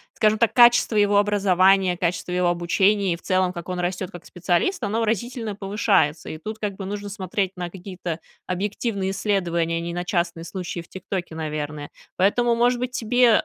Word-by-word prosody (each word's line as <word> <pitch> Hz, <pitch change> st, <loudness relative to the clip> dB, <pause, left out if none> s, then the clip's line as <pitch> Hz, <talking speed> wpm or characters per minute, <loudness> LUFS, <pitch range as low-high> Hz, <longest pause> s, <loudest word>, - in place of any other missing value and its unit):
Скажем 215 Hz, 0 st, +3 dB
так, 230 Hz, -2 st, +3 dB
качество 240 Hz, -2 st, +6 dB
его 205 Hz, -1 st, +4 dB
образования, 195 Hz, -2 st, +3 dB
качество 180 Hz, 0 st, -2 dB
его 180 Hz, 0 st, +1 dB
обучения, 180 Hz, +3 st, +2 dB
и -, -, -2 dB
в -, -, -21 dB
целом, 185 Hz, -1 st, +1 dB
как 170 Hz, -1 st, -8 dB
он 180 Hz, -1 st, -3 dB
растет 180 Hz, +1 st, -2 dB
как 175 Hz, -3 st, -11 dB
специалист, 180 Hz, -, 0 dB
оно 210 Hz, +2 st, -1 dB
выразительно 225 Hz, 0 st, -2 dB
повышается. 195 Hz, -6 st, +1 dB
И 155 Hz, -, -6 dB
тут 215 Hz, +7 st, -7 dB
как 205 Hz, -3 st, -3 dB
бы 195 Hz, -, -6 dB
нужно 205 Hz, +1 st, -5 dB
смотреть 195 Hz, -1 st, -2 dB
на 175 Hz, -1 st, -4 dB
какие-то 180 Hz, -2 st, -6 dB, 0.3 s
объективные 195 Hz, +1 st, -2 dB
исследования, 175 Hz, -5 st, 0 dB
а -, -, -1 dB
не 170 Hz, 0 st, -4 dB
на 175 Hz, +1 st, -3 dB
частные 170 Hz, -2 st, -1 dB
случаи 180 Hz, 0 st, -5 dB
в 170 Hz, -, -9 dB
ТикТоке, 185 Hz, -3 st, -5 dB
наверное. 150 Hz, -2 st, -4 dB, 0.3 s
Поэтому, 235 Hz, +5 st, +2 dB
может 240 Hz, +1 st, +2 dB
быть, 250 Hz, 0 st, -2 dB
тебе, 245 Hz, -1 st, +3 dB
190 Hz, 185 wpm, -23 LUFS, 175-210 Hz, 0.3 s, качество